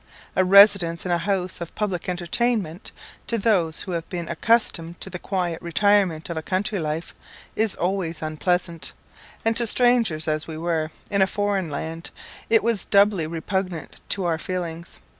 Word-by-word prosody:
A 190 - +4
residence 190 -3 +6
in 180 - -1
a 175 - +2
house 185 0 -2
of 170 - -7
public 190 -5 -2
entertainment, 180 0 -1 0.4
to 230 - 0
those 190 -8 +1
who 185 - -6
have 165 -2 -4
been 175 -2 -4
accustomed 170 -3 +1
to - - -5
the 180 - -6
quiet 180 -4 -2
and - - -33
retirement 190 -3 +2
of 170 - -5
a 160 - -3
country 195 +4 -1
life, 155 +1 -3 0.4
is 220 -2 +2
always 175 -3 -2
unpleasant, 170 +2 -2 0.5
and 225 0 +2
to 235 0 +5
strangers 230 -10 +3
as 155 0 -1
we 160 -1 -6
were, 160 -1 -1 0.2
in 200 -1 +2
a 190 - +5
foreign 200 -4 -1
land, 160 +3 -5 0.4
it 225 -2 +5
was 230 -3 +2
doubly 200 -5 +3
repugnant 175 +1 -4
to 195 -2 +1
our 165 -2 0
feelings. 170 -2 -5
180 Hz, 170 wpm, -23 LUFS, 165-200 Hz, 0.5 s, residence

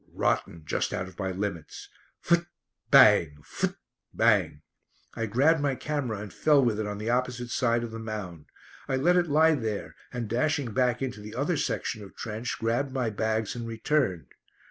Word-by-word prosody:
Rotten! 85 -1 -1
Just - - -1
out 95 - -3
of 95 - -14
my 95 -1 -1
limits. 95 -4 -5 0.4
Phut 170 0 +2 0.4
bang! 75 -3 +6
Phut - - -2 0.4
bang! 95 -10 +2 0.5
I 115 - -3
grabbed 140 +8 +3
my 140 -2 +1
camera 140 -7 -3
and 105 -2 -8
fell 145 -4 +4
with 110 -3 +1
it 110 - -2
on 105 0 -4
the 110 +3 -2
opposite 125 -1 -1
side 120 -1 +1
of 115 - -5
the 115 - -6
mound. 105 -8 -6 0.4
I 135 - 0
let 170 +7 +3
it 175 -1 +3
lie 160 +2 +5
there, 110 -7 -3 0.2
and 120 -2 -4
dashing 125 +1 0
back 125 0 +1
into 125 -5 -4
the 105 +1 -9
other 145 +7 0
section 125 -5 -2
of 95 - -13
trench 115 +1 -4
grabbed 120 +5 -1
my 125 -4 -1
bags 110 0 -1
and 120 -1 -5
returned. 115 - -1
115 Hz, 180 wpm, -27 LUFS, 105-135 Hz, 0.5 s, bang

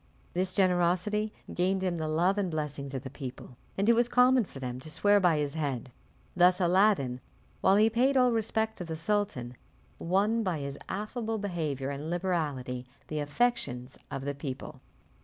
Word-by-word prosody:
This 185 +1 -1
generosity 185 +3 +2 0.2
gained 190 +2 +1
him 180 -2 0
the 160 -1 -2
love 175 +6 +2
and 190 -3 0
blessings 150 -3 -4
of 130 - -4
the 130 - -7
people, 130 -2 -8 0.2
and 200 +2 +1
it 235 - +7
was 240 +1 +2
common 250 -1 +5
for 145 - -12
them 125 -1 -4
to 145 - -8
swear 205 +6 +4
by 175 -5 +3
his 145 -1 -1
head. 140 -5 -3 0.4
Thus 180 +1 +5
Aladdin, 180 -9 +3 0.4
while 190 - +5
he 215 +2 +5
paid 250 +5 +2
all 250 -1 +5
respect 220 0 -1
to - - -3
the 165 -2 -5
sultan, 160 - -1 0.4
won 205 +6 +2
by 185 -6 -1
his 140 -1 -5
affable 220 +2 -3
behaviour 155 -9 -2
and 145 +3 -5
liberality 150 -9 -2 0.2
the 155 - -2
affections 145 - -1
of 135 0 -5
the 140 - -1
people. 140 -2 -7
175 Hz, 175 wpm, -29 LUFS, 140-205 Hz, 0.4 s, it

